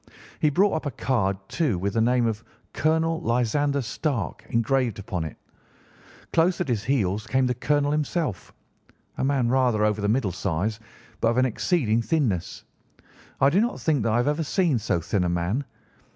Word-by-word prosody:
He 150 - +3
brought 190 +7 +3
up 160 -2 -2
a - - 0
card, 110 -7 0
too, 145 - 0
with 100 +3 -2
the 115 - +2
name 120 +1 +3
of 110 -1 -2 0.3
'Colonel 160 +1 +1
Lysander 140 +4 +1
Stark' 120 - -3
engraved 115 -1 +1
upon 95 -4 -4
it. 80 - -7 1.0
Close 170 +2 +3
at - - -1
his 110 -4 0
heels 105 -6 0
came 130 0 +2
the 125 - +1
colonel 145 +3 +1
himself, 150 - -2 0.7
a - - 0
man 135 -3 +1
rather 125 -4 +2
over 105 0 0
the 100 - 0
middle 110 -3 +1
size, 95 +4 -2 0.4
but - - +2
of 115 +1 +1
an 130 - +4
exceeding 120 -2 +1
thinness. 115 - -1 0.8
I 135 +1 +5
do 190 +6 +3
not 240 +2 -1
think 150 -5 +1
that 110 - 0
I - - +3
have 120 - +1
ever 150 +2 +1
seen 160 - +1
so 100 -5 0
thin 90 +3 0
a 90 - 0
man. 90 +11 -1
125 Hz, 180 wpm, -25 LUFS, 105-145 Hz, 1.0 s, I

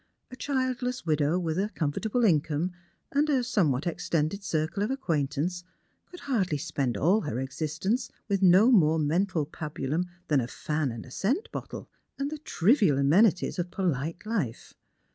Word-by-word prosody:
A - - -7
childless 255 -4 -2
widow, 155 +1 +2
with 165 -1 -1
a 205 +2 0
comfortable 220 +9 -1
in 160 -8 +4
come 155 +5 -2 0.4
and 295 +2 +2
a 265 -4 +2
somewhat 165 - +1
extended 170 +2 -1
circle 160 +2 -1
of 210 - 0
acquaintance, 170 - -1 0.5
could 360 - -11
hardly 205 - 0
spend 140 -7 -2
all 185 - +3
her 135 -6 -3
existence 155 - -2 0.2
with 200 -2 0
no 190 +6 +6
more 160 -8 +5
mental 160 +2 +1
pabulum 155 +1 -3 0.2
than 145 -4 +3
a 120 - -3
fan 150 +1 -2
and 115 -1 -7
a 130 - -14
scent 280 - -1
bottle, - - -7 0.3
and 280 +1 -2
the 310 - -5
trivial 200 - +3
amenities 180 +7 +3
of 175 0 -2
i^olite 170 -1 -2
life. 200 - -3
175 Hz, 160 wpm, -28 LUFS, 150-220 Hz, 0.5 s, no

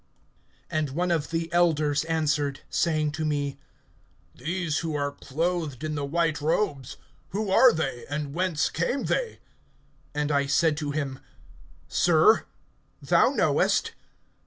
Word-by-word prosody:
(13)And 155 -2 0
one 175 +3 0
of 155 -4 0
the 165 0 -3
elders 155 -4 +2
answered, 150 -3 0
saying 155 -2 +1
to 150 +2 -4
me: 145 -2 -2 0.7
These 170 -2 -2
who 160 -2 -3
are 145 -1 -1
clothed 155 -1 -3
in 155 0 -2
the 145 -1 -3
white 165 +1 0
robes, 150 - -1 0.3
who 200 0 -2
are 250 +5 +7
they, 135 -7 -3
and 145 -1 -3
whence 175 -2 0
came 245 +11 -1
they? 485 -2 -1 0.8
(14)And 150 0 0
I 140 -1 +1
said 155 +2 +3
to 150 -2 -3
him: 140 -3 -3 0.7
Sir, - - +4 0.5
thou - - +4
knowest. - - +2
155 Hz, 135 wpm, -26 LUFS, 145-170 Hz, 0.8 s, are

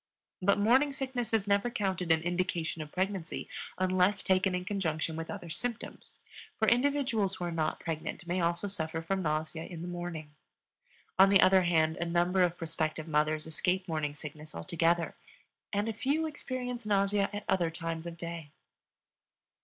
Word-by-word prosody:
But 200 +2 +4
morning 255 +8 +4
sickness 260 -3 -3
is 220 -3 +2
never 200 +3 +2
counted 190 -6 -1
an 160 0 +3
indication 175 -2 -1
of 150 -1 -7
pregnancy 185 -2 -2 0.3
unless 185 +1 +2
taken 190 0 +2
in 180 0 -3
conjunction 160 -5 -1
with 165 0 -5
other 170 - -6
symptoms, 240 +5 -4 0.4
for 220 - +2
individuals 245 -6 +2
who - - -6
are 175 - -2
not 160 -2 -1
pregnant 165 +1 -4
may 175 +1 0
also 170 +3 0
suffer 160 -4 -2
from 190 +3 -1
nausea 155 0 -1
in 170 -1 -7
the - - -5
morning. 175 -4 -5 0.9
On 195 +1 +9
the 195 -1 +6
other 190 +1 +6
hand, 160 -2 +2
a 175 - -1
number 175 +2 +2
of 175 -1 +2
prospective 155 -1 -2
mothers 155 0 +1
escape 180 +4 0
morning 155 -3 -2
sickness 150 +1 -9
altogether, 165 - +1 0.6
and 205 +1 0
a 225 - -1
few 285 +7 0
experience 255 -5 -4
nausea 200 0 +2
at 205 0 -5
other 180 -3 +2
times 165 0 -4
of 170 0 -7
day. 170 -2 -6
180 Hz, 165 wpm, -31 LUFS, 165-200 Hz, 0.9 s, On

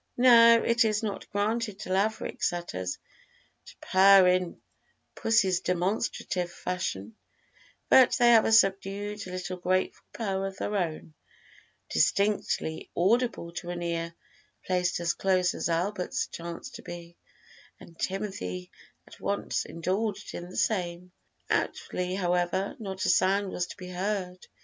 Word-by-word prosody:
Now, 230 -2 +7
it 235 +1 +3
is 215 0 0
not 205 -3 -4
granted 210 +1 -1
to 185 - -3
Laverick 210 +3 -1
setters 95 - -2 0.7
to - - -13
purr 190 0 +6
in 180 -1 0 0.5
pussy's 200 -5 +2
demonstrative 180 -1 -1
fashion, 110 - -4 0.7
but 260 -2 +6
they 240 0 +5
have 225 -2 +6
a - - +1
subdued 200 -1 +1
little 185 0 -5
grateful 185 +1 -1
purr 195 -4 -2
of 195 0 -8
their 210 - -3
own, 165 -4 -3 0.7
distinctly 195 - 0
audible 220 -1 +1
to 175 0 -6
an 175 0 -4
ear 170 0 -3 0.5
placed 180 -1 0
as 170 -2 0
close 185 -2 +1
as - - -3
Albert's 180 +3 -1
chanced 170 0 -8
to - - -12
be, 170 0 -9 0.6
and 165 - -15
Timothy 140 - -4 0.3
at - - -16
once - - -2
indulged 195 +4 -3
in 175 +1 -7
the 185 - -9
same. 180 -3 -1 0.4
Outwardly, 180 0 -1
however, 180 +1 0
not 190 -3 -4
a - - +2
sound 195 +2 +2
was 175 - -2
to - - -10
be 180 0 -9
heard. 185 -1 -3
185 Hz, 135 wpm, -28 LUFS, 175-205 Hz, 0.7 s, Now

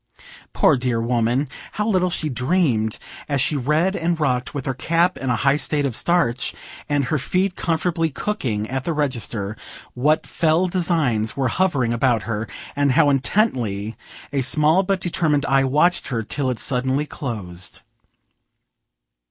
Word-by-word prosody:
Poor - - +4
dear 125 -2 0
woman! 120 +3 +1 0.3
how 210 +1 -1
little 185 -4 +2
she 170 -3 -2
dreamed, 125 - 0 0.3
as 140 -1 +1
she 150 +3 +1
read 150 +8 +1
and 170 -1 -1
rocked, 125 -5 0
with 140 -3 -5
her 135 - -1
cap 170 +7 +1
in 135 - -4
a 125 - +2
high 135 +5 +2
state 145 0 0
of 130 -5 -2
starch, 150 -9 +1 0.3
and 145 -1 +2
her 150 +4 0
feet 185 +7 0
comfortably 165 0 0
cooking 130 - -2
at 130 +2 -3
the 170 - -1
register, 115 -8 -2 0.4
what 150 +5 +1
fell 165 +2 +1
designs 160 - 0
were 135 -2 +1
hovering 140 -9 +1
about 120 -2 +1
her, 110 -1 -3 0.3
and 140 -2 +2
how 145 +2 +4
intently 120 - 0 0.4
a 140 - +1
small 155 +6 +4
but 195 0 0
determined 160 -5 0
eye 135 0 +3
watched 150 +7 +2
her, 120 -5 -2
till 130 +4 -2
it 125 - -2
suddenly 130 +3 0
closed. 100 -12 -7
140 Hz, 155 wpm, -21 LUFS, 120-165 Hz, 0.4 s, Poor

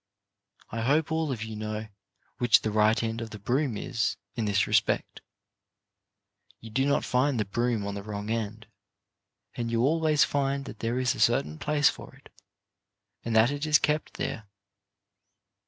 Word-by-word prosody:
I 115 - -3
hope 145 +6 +2
all 160 -2 0
of 115 -4 -3
you 110 -1 -6
know 110 0 -4 0.5
which 120 -2 +5
the 110 - -1
right 110 +2 +3
end 115 +1 -2
of 115 - -5
the 105 - -8
broom 120 +3 0
is 115 +1 -1 0.2
in 110 +1 -2
this 100 -1 +2
respect. - - 0 1.4
You 115 - -11
do 135 +5 +1
not 140 - +1
find 125 0 +1
the 105 - +1
broom 115 +1 -1
on 100 - -3
the 100 - -5
wrong 105 +1 -5
end, 110 -1 -3 0.9
and 120 -1 -3
you 115 0 +1
always 155 +1 +3
find 140 -1 0
that - - -9
there 115 +2 -1
is 130 -1 +1
a - - -9
certain 75 +1 +2
place 150 -1 +3
for - - -9
it, 135 - -20 0.9
and 115 -1 -2
that 110 +4 +5
it 145 +2 -3
is 150 -1 +6
kept 150 +1 -1
there. 110 -2 -4
115 Hz, 170 wpm, -28 LUFS, 110-140 Hz, 1.4 s, is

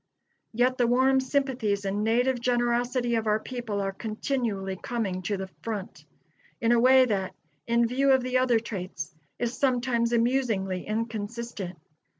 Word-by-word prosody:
Yet, 250 +3 +1
the 240 - +4
warm 260 +2 +4
sympathies 255 -7 0
and 200 +2 -1
native 245 +3 +2
generosity 240 0 +1
of 225 -1 0
our 210 0 +3
people 235 -4 -4
are 195 0 -1
continually 215 -2 -2
coming 195 -3 -3
to 200 +3 -2
the 190 - -4 0.2
front, 210 -4 -5 0.5
in 230 - +2
a 240 - +5
way 260 +1 +6
that, 195 -5 -2 0.3
in 235 0 +3
view 270 +3 +2
of 260 -1 +4
the 255 0 +1
other 250 -2 +3
traits, 185 -9 -6 0.2
is 240 0 -2
sometimes 245 -3 +1
amusingly 230 -6 0
inconsistent. 220 -3 -4
235 Hz, 150 wpm, -27 LUFS, 205-250 Hz, 0.5 s, way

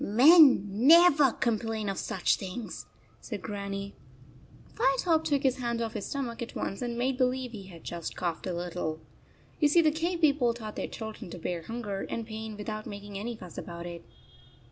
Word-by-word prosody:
"Men 270 - +7
never 285 - +6
complain 225 -2 -1
of 195 -1 -2
such - - +1
things," 200 +4 -6 0.3
said 210 -6 -7
Grannie. 200 -1 -5 0.8
29 270 0 +2
Firetop 320 +1 +2
took 285 -3 0
his 265 -2 +2
hand 235 -2 -2
off 230 -1 -2
his 215 - -4
stomach 250 -5 -4
at 235 - -6
once 195 - -3
and 240 -1 -3
made 255 +2 0
believe 255 -1 0
he 200 -4 -9
had 170 -3 -12
just 170 -1 -5
coughed 175 +1 -3
a 180 - -2
little. 170 -2 -3 0.6
You 295 - +5
see 335 +4 +5
the 310 - +4
cave 335 +3 -2
people 280 -6 +3
taught 215 -3 -7
their - - -3
children 220 -5 -7
to 180 - -7
bear 175 0 -3
hunger 210 0 -5
and 230 - -3
pain 220 -1 -7
with 210 - -7
out 215 -1 -4
making 200 0 -7
any 235 +3 -4
fuss 180 -5 -9
about 170 0 -7
it. 170 -1 -7
225 Hz, 190 wpm, -29 LUFS, 195-260 Hz, 0.8 s, Men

